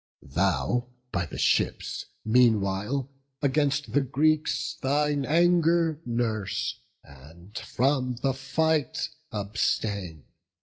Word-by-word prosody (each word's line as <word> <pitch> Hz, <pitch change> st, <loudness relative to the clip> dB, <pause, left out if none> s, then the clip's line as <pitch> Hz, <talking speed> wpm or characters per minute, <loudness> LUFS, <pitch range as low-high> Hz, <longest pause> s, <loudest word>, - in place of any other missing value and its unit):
Thou 120 Hz, -, +1 dB, 0.2 s
by 90 Hz, -3 st, -1 dB
thy -, -, -8 dB
ships, -, -, 0 dB, 0.2 s
meanwhile, 110 Hz, +2 st, +2 dB, 0.3 s
against 145 Hz, 0 st, +1 dB
the 145 Hz, -, +4 dB
Greeks 155 Hz, +3 st, +1 dB
Thine 145 Hz, +1 st, +1 dB
anger 170 Hz, -1 st, +3 dB
nurse, 110 Hz, -3 st, -1 dB, 0.2 s
and 80 Hz, -, -16 dB
from 130 Hz, 0 st, 0 dB
the 135 Hz, -1 st, +2 dB
fight 155 Hz, +3 st, 0 dB, 0.2 s
abstain. 100 Hz, -5 st, -2 dB
130 Hz, 90 wpm, -27 LUFS, 105-150 Hz, 0.3 s, the